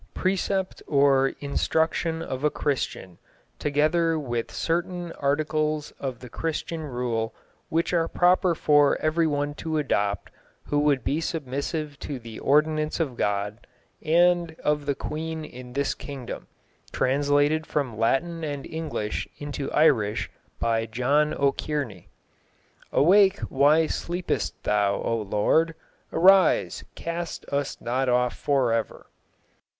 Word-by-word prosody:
Precept 190 0 -1
or 140 -1 +4
instruction 160 +3 0
of 130 -3 -5
a 150 - +4
Christian, 125 - -3 0.4
together 155 +3 +2
with 120 -6 -3
certain 175 +1 -2
articles 155 +1 -1
of 130 -3 -4
the 125 - -8
Christian 160 +4 -3
rule, 120 -5 -2 0.3
which 165 +2 0
are 165 -1 +2
proper 180 0 +3
for 145 -2 +4
everyone 155 -2 +1
to 160 +1 -3
adopt 105 -9 -1 0.3
who 145 - 0
would 145 -4 +2
be 150 +4 0
submissive 145 -1 -3
to 145 - -5
the 115 -2 -9
ordinance 155 +2 +2
of 145 -7 -1
God 105 +1 -2 0.4
and 170 0 +3
of 150 -1 0
the 140 - +1
Queen 160 +2 -4
in 125 -2 -10
this 140 +1 0
Kingdom; 135 -4 -7 0.4
translated 145 +3 +2
from 135 -7 -1
Latin 160 +9 0
and 145 -3 -4
English 160 -10 -3
into 145 -1 -5
Irish 110 -9 +2 0.3
by 115 -1 0
John 140 +7 +2
O'Kearney. 140 - -2 0.8
Awake, 195 +5 +5
why 145 +4 +4
sleepest 175 +3 -3
thou, 100 -1 +2
O 115 - -1
Lord? 130 +11 +2 0.4
Arise, 190 0 +4
cast 170 0 -5
us 140 0 -2
not 125 +2 -1
off 125 0 +2
for 135 -5 +1
ever. 115 -1 -3
145 Hz, 120 wpm, -25 LUFS, 130-160 Hz, 0.8 s, Awake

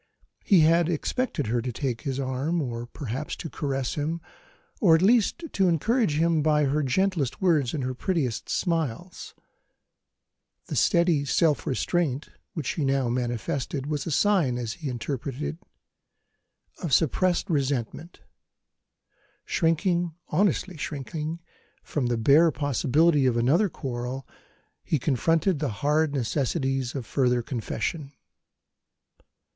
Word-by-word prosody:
He 190 -6 +5
had 165 +2 +4
expected 175 - -1
her 120 +2 0
to 125 +1 -3
take 125 -1 -3
his 135 -3 -3
arm, 135 +6 -1
or 120 -5 -4
perhaps 135 +2 -5
to 165 - -7
caress 135 -3 -2
him, 155 +3 -2 0.6
or 175 -7 +6
at 165 - +2
least 235 - +3
to 190 -1 +3
encourage 180 - +1
him 165 -1 +2
by 150 0 +3
her 145 +3 +1
gentlest 150 -1 0
words 155 -9 +2
and 140 - -2
her 130 0 -2
prettiest 130 - -2
smiles. 165 0 -2 1.3
The - - -5
steady 170 -6 +3
self 150 +1 +1
restraint 145 0 -1 0.3
which 155 -5 -3
she 155 - -1
now 135 -2 +1
manifested 125 - -2
was 150 0 -3
a - - -1
sign, 165 -7 +2
as 115 -2 -3
he 155 -5 -5
interpreted 130 +2 -4
it, 160 - -3 1.2
of 160 -9 +2
suppressed 175 +4 +1
resentment. 140 - -2 1.2
Shrinking, 170 0 +1
honestly 190 -2 +1
shrinking, 155 +3 -4 0.4
from 135 -5 -2
the 120 -1 0
bare 145 +9 +5
possibility 145 +1 +2
of 120 -2 +1
another 150 - +3
quarrel, 130 -2 -5 0.6
he 155 - 0
confronted 160 +6 +1
the 150 -2 -1
hard 150 +8 +1
necessities 135 0 -1
of 130 -4 -4
further 125 -1 +1
confession. 135 +4 -4
145 Hz, 130 wpm, -26 LUFS, 130-170 Hz, 1.3 s, or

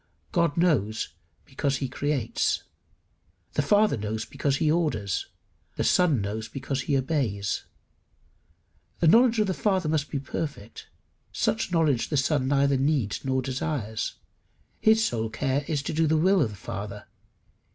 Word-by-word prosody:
God 170 -4 +1
knows 125 - +1 0.4
because 140 0 -1
he 135 - -2
creates. 135 -2 -1 0.9
The - - +2
Father 205 +8 +3
knows 110 +1 -3
because 140 -2 -1
he 155 0 +2
orders. 150 - 0 0.5
The - - -1
Son 160 - +3
knows 110 +3 -3
because 135 0 -3
he 140 0 +1
obeys. 125 -8 -1 1.3
The - - +2
knowledge 235 +6 +6
of 210 - +4
the 190 - -1
Father 190 -4 0
must 150 -2 0
be - - -2
perfect; 140 -5 -6 0.4
such - - 0
knowledge 155 -8 +2
the 150 - 0
Son 135 -1 +1
neither 140 0 +3
needs 135 -6 0
nor 130 -1 0
desires. 125 -4 -3 0.6
His 220 0 +4
sole 115 - -1
care 135 +4 -1
is 145 -3 -1
to 155 - -3
do 160 +1 +2
the 160 +1 +3
will 185 +3 +4
of 125 - +2
the 105 - -9
Father. 100 +1 -6
140 Hz, 150 wpm, -26 LUFS, 115-160 Hz, 1.3 s, knowledge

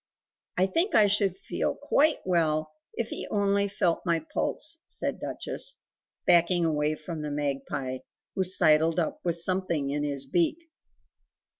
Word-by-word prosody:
"I 185 - +4
think 335 - 0
I 215 - +7
should 200 -2 +2
feel - - -2
QUITE 305 +2 +2
well 155 -3 +1 0.2
if 235 -1 -2
he - - -5
only 200 -1 +2
felt 180 -4 0
my 165 -3 0
pulse," 330 +2 -1
said - - -2
Duchess, - - -3 0.5
backing 175 0 +4
away 150 -1 +1
from 155 0 -7
the 150 - -4
magpie, 135 -2 -3 0.3
who 190 - 0
sidled 160 -2 +4
up 165 - -2
with 170 -2 +1
something 170 -5 0
in 145 +1 -1
his 140 -2 -2
beak. 170 - +1
170 Hz, 145 wpm, -27 LUFS, 150-195 Hz, 0.5 s, I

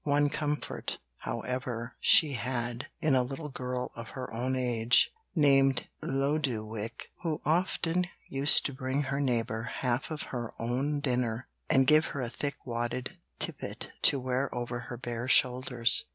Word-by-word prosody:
One 145 0 +2
comfort, 150 -1 -2 0.2
however, 125 0 -4
she 155 -5 +6
had, 120 +1 -2
in 155 -4 +3
a 130 - +5
little 135 +5 -5
girl 125 -1 -4
of 115 -1 -8
her 130 - -5
own 125 +3 0
age, 120 -2 +3 0.2
named 135 -4 +4
Lodowick, 120 -6 -2
who 160 -3 -2
often 175 +1 +1 0.2
used 135 +2 +4
to 140 - -1
bring 130 +2 -1
her 135 0 -2
neighbour 115 -4 0
half 125 0 -1
of 155 -1 -4
her 120 -3 -4
own 135 +5 -1
dinner, 125 -2 -1 0.2
and 135 0 +5
gave 155 +3 +5
her 140 - -4
a 120 - -2
thick 140 +3 -3
wadded 120 +1 -3 0.2
tippet - - -4
to 140 - +5
wear 130 +1 -1
over 120 0 -3
her 120 - -5
bare 120 0 -4
shoulders. 125 -2 +5
130 Hz, 150 wpm, -30 LUFS, 120-140 Hz, 0.2 s, she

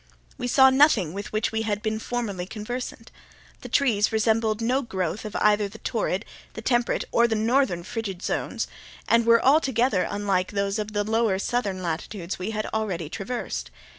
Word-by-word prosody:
We 245 - -4
saw 265 +1 +6
nothing 260 - +4
with 200 +1 -6
which 215 0 0
we 220 0 -1
had 210 -2 -2
been 220 0 -1
formerly 215 -7 -3
conversant. 225 +2 -6 0.5
The - - -8
trees 225 -7 +2
resembled 220 0 +1
no 250 +4 +1
growth 190 - -3
of 210 - -6
either 210 -1 +3
the 215 - -11
torrid, 220 -4 -2 0.3
the - - -7
temperate, 240 0 +1
or 235 0 +4
the 225 - 0
northern 220 -5 +1
frigid 200 -3 -5
zones, - - -2 0.4
and 230 0 +3
were 230 0 +5
altogether 260 - +3
unlike 200 -2 -1
those 200 +1 0
of 210 0 -4
the 205 0 +1
lower 220 -2 +1
southern 200 -3 -2
latitudes 170 +2 -4
we 185 +3 -3
had 215 -1 -2
already 190 -8 -2
traversed. 225 +7 -4
215 Hz, 170 wpm, -25 LUFS, 200-235 Hz, 0.5 s, saw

